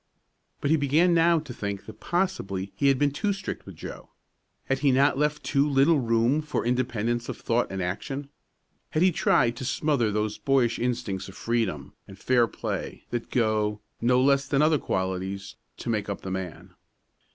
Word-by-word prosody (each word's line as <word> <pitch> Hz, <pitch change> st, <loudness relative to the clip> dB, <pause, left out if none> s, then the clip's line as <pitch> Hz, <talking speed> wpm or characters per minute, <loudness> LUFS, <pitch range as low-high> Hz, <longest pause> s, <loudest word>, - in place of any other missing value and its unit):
But 145 Hz, -, 0 dB
he 160 Hz, -, +5 dB
began 155 Hz, +5 st, +3 dB
now 170 Hz, 0 st, +5 dB
to 150 Hz, -5 st, -5 dB
think 100 Hz, -2 st, -4 dB
that -, -, -11 dB
possibly 100 Hz, -, -1 dB
he 140 Hz, -, +1 dB
had 135 Hz, -1 st, +4 dB
been 145 Hz, +1 st, +2 dB
too 205 Hz, +9 st, -1 dB
strict 190 Hz, 0 st, -6 dB
with -, -, -9 dB
Joe. -, -, -9 dB, 0.6 s
Had 135 Hz, 0 st, 0 dB
he 140 Hz, -1 st, +3 dB
not 135 Hz, +3 st, +4 dB
left 150 Hz, +2 st, 0 dB
too 140 Hz, +1 st, +2 dB
little 140 Hz, +3 st, +4 dB
room 115 Hz, +4 st, +2 dB
for 150 Hz, -, -3 dB
independence 120 Hz, -1 st, -1 dB
of -, -, -4 dB
thought 120 Hz, +1 st, 0 dB
and 95 Hz, -1 st, -2 dB
action? 135 Hz, +10 st, -4 dB, 0.6 s
Had 155 Hz, -, +1 dB
he 185 Hz, -, +5 dB
tried 120 Hz, -6 st, +2 dB
to -, -, -5 dB
smother 130 Hz, -4 st, +1 dB
those 105 Hz, 0 st, -1 dB
boyish 130 Hz, -4 st, +2 dB
instincts 100 Hz, -6 st, -2 dB
of 95 Hz, -, -12 dB
freedom 115 Hz, -, -1 dB
and 100 Hz, -, -12 dB
fair 120 Hz, +2 st, +3 dB
play -, -, -5 dB
that 120 Hz, -1 st, -3 dB
go, 110 Hz, -3 st, +1 dB, 0.2 s
no 125 Hz, +1 st, +4 dB
less 135 Hz, +1 st, +3 dB
than 140 Hz, +1 st, +2 dB
other 155 Hz, -1 st, +4 dB
qualities, 95 Hz, 0 st, -3 dB, 0.2 s
to -, -, -6 dB
make 105 Hz, -2 st, -1 dB
up 100 Hz, -, -4 dB
the 95 Hz, -, -5 dB
man? 95 Hz, -3 st, -6 dB
125 Hz, 185 wpm, -26 LUFS, 105-145 Hz, 0.6 s, he